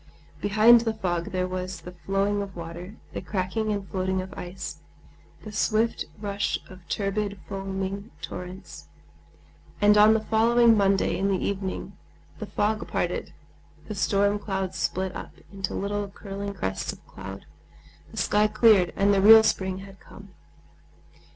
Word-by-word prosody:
Behind 215 Hz, +3 st, +6 dB
the 225 Hz, -1 st, -1 dB
fog 175 Hz, -5 st, -1 dB
there 185 Hz, 0 st, 0 dB
was 185 Hz, -1 st, -5 dB
the 180 Hz, -, -9 dB
flowing 195 Hz, +3 st, -1 dB
of 200 Hz, -1 st, -7 dB
water, 170 Hz, +4 st, -8 dB, 0.2 s
the -, -, -4 dB
cracking 195 Hz, +3 st, -2 dB
and 200 Hz, -2 st, -3 dB
floating 190 Hz, 0 st, -1 dB
of 185 Hz, 0 st, -6 dB
ice, 180 Hz, +2 st, -6 dB, 0.7 s
the 215 Hz, -, -8 dB
swift 215 Hz, +2 st, +1 dB
rush 200 Hz, -1 st, -1 dB
of 185 Hz, -2 st, -14 dB
turbid, 200 Hz, 0 st, -2 dB
foaming 195 Hz, +1 st, -4 dB
torrents; 180 Hz, +2 st, -8 dB, 0.9 s
and 210 Hz, 0 st, +5 dB
on 215 Hz, +1 st, +7 dB
the -, -, +3 dB
following 230 Hz, +1 st, +5 dB
Monday, 195 Hz, -1 st, +2 dB
in 195 Hz, -, 0 dB
the 195 Hz, -1 st, +2 dB
evening, 190 Hz, -1 st, -3 dB, 0.4 s
the -, -, -5 dB
fog 215 Hz, 0 st, -1 dB
parted, -, -, -2 dB, 0.6 s
the 215 Hz, -, -4 dB
storm 200 Hz, +1 st, +2 dB
clouds 190 Hz, -2 st, -3 dB
split 185 Hz, 0 st, -2 dB
up -, -, -7 dB, 0.2 s
into 195 Hz, -2 st, -3 dB
little 205 Hz, 0 st, -2 dB
curling 200 Hz, 0 st, -6 dB
crests 95 Hz, -, -2 dB
of -, -, -15 dB
cloud, 95 Hz, +1 st, -9 dB, 0.6 s
the -, -, -13 dB
sky 210 Hz, +1 st, +3 dB
cleared, 215 Hz, -4 st, +5 dB
and 200 Hz, +1 st, +3 dB
the 195 Hz, -, +3 dB
real 220 Hz, +2 st, +9 dB
spring 190 Hz, -3 st, 0 dB
had 195 Hz, -1 st, -14 dB
come. 200 Hz, -1 st, -14 dB
195 Hz, 150 wpm, -26 LUFS, 185-210 Hz, 0.9 s, real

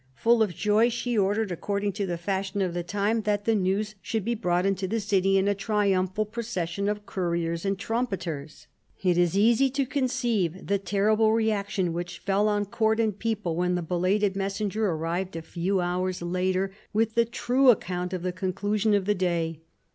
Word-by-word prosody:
Full 230 Hz, -, +3 dB
of 200 Hz, -6 st, +1 dB
joy, 215 Hz, +5 st, +3 dB
she 240 Hz, 0 st, -2 dB
ordered, 205 Hz, 0 st, +1 dB
accord 200 Hz, +4 st, -2 dB
ing 205 Hz, -, +1 dB
to* 200 Hz, 0 st, -3 dB
the 175 Hz, -1 st, -2 dB
fashion 195 Hz, +2 st, -2 dB
of 180 Hz, -2 st, -2 dB
the 175 Hz, -, -2 dB
time, 205 Hz, +5 st, 0 dB
that 205 Hz, -1 st, -1 dB
the 225 Hz, -, +3 dB
hews 200 Hz, +2 st, 0 dB
should 220 Hz, -4 st, -2 dB
be 235 Hz, -, +1 dB
brought 180 Hz, -5 st, 0 dB
into 195 Hz, -1 st, 0 dB
the 225 Hz, +4 st, -1 dB
city 195 Hz, -2 st, +2 dB
in 190 Hz, +1 st, +2 dB
a 205 Hz, -, +3 dB
triumphal. 200 Hz, -1 st, 0 dB
procession 200 Hz, -4 st, -3 dB
of 210 Hz, 0 st, -3 dB
couriers 170 Hz, -3 st, -2 dB
and 195 Hz, 0 st, 0 dB
trumpeters. 190 Hz, -, -3 dB, 0.4 s
It 180 Hz, -2 st, +3 dB
is 175 Hz, +1 st, +2 dB
easy 235 Hz, +6 st, +4 dB
to 275 Hz, +1 st, 0 dB
conceive 240 Hz, -, -1 dB
the 200 Hz, 0 st, +1 dB
terrible 215 Hz, +3 st, +2 dB
reaction 200 Hz, -5 st, 0 dB
which 175 Hz, 0 st, -4 dB
fell 200 Hz, +3 st, +1 dB
on 205 Hz, -1 st, +1 dB
court 220 Hz, +2 st, +1 dB
and 215 Hz, -3 st, 0 dB
people 210 Hz, -7 st, -1 dB
when 180 Hz, +1 st, +1 dB
the 175 Hz, -, -2 dB
belated 190 Hz, +4 st, +1 dB
messenger 200 Hz, +2 st, -1 dB
arrived 170 Hz, +3 st, -2 dB
a 165 Hz, -, -5 dB
few 185 Hz, +4 st, -1 dB
hours 180 Hz, 0 st, -2 dB
later, 185 Hz, +2 st, 0 dB, 0.2 s
with 220 Hz, +1 st, +1 dB
the 235 Hz, -, +4 dB
true 250 Hz, +3 st, +2 dB
account 180 Hz, -5 st, +1 dB
of 185 Hz, -2 st, -4 dB
the 180 Hz, -, -1 dB
conclusion 205 Hz, +3 st, 0 dB
of 200 Hz, -2 st, 0 dB
the 210 Hz, -, +3 dB
day. 170 Hz, -4 st, -1 dB
195 Hz, 190 wpm, -26 LUFS, 180-215 Hz, 0.4 s, easy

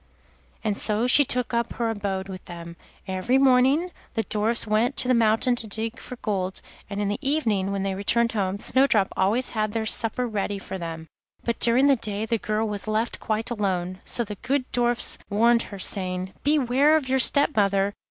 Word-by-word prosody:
And 215 Hz, -2 st, -1 dB
so 215 Hz, +3 st, 0 dB
she 265 Hz, +3 st, +6 dB
took 250 Hz, -2 st, -1 dB
up 235 Hz, 0 st, -1 dB
her 230 Hz, -2 st, -1 dB
abode 195 Hz, -3 st, -4 dB
with 185 Hz, -2 st, -8 dB
them. 170 Hz, -1 st, -9 dB, 0.3 s
Every 190 Hz, +7 st, 0 dB
morning 270 Hz, +6 st, +3 dB, 0.2 s
the 225 Hz, -, 0 dB
Dwarfs 220 Hz, +3 st, 0 dB
went 220 Hz, +4 st, +1 dB
into 255 Hz, -, +2 dB
the 255 Hz, -, +3 dB
mountain 230 Hz, +1 st, +2 dB
to 225 Hz, -, -4 dB
dig 220 Hz, +3 st, -4 dB
for 250 Hz, -, -9 dB
gold, 190 Hz, -3 st, -2 dB, 0.3 s
and 200 Hz, -1 st, -5 dB
in 205 Hz, -, -1 dB
the 205 Hz, -, -2 dB
evening, 225 Hz, -10 st, 0 dB
when 195 Hz, -1 st, -2 dB
they 195 Hz, -1 st, -1 dB
returned 230 Hz, +4 st, 0 dB
home, 195 Hz, -3 st, -2 dB
Snowdrop 235 Hz, -6 st, +2 dB
always 215 Hz, +7 st, +1 dB
had 215 Hz, -2 st, -2 dB
their 225 Hz, -1 st, -2 dB
supper 225 Hz, +3 st, +1 dB
ready 205 Hz, -3 st, -3 dB
for 190 Hz, -1 st, -7 dB
them. 165 Hz, -1 st, -6 dB, 0.4 s
But 235 Hz, -, -2 dB
during 240 Hz, +3 st, +4 dB
the 280 Hz, -1 st, +5 dB
day 210 Hz, -1 st, -2 dB
the 225 Hz, 0 st, -1 dB
girl 215 Hz, +2 st, -1 dB
was 205 Hz, 0 st, -4 dB
left 220 Hz, +2 st, -1 dB
quite 220 Hz, +2 st, -3 dB
alone, 185 Hz, -4 st, -2 dB
so 240 Hz, -, -1 dB
the 210 Hz, -2 st, -8 dB
good 255 Hz, +2 st, -1 dB
Dwarfs 240 Hz, 0 st, 0 dB
warned 230 Hz, +3 st, +3 dB
her, 200 Hz, -, -8 dB
saying: 185 Hz, -1 st, -1 dB
'Beware 285 Hz, 0 st, +3 dB
of 285 Hz, -4 st, -4 dB
your 265 Hz, 0 st, +1 dB
step 285 Hz, +3 st, +5 dB
mother. 200 Hz, -1 st, +1 dB
220 Hz, 195 wpm, -24 LUFS, 200-245 Hz, 0.4 s, she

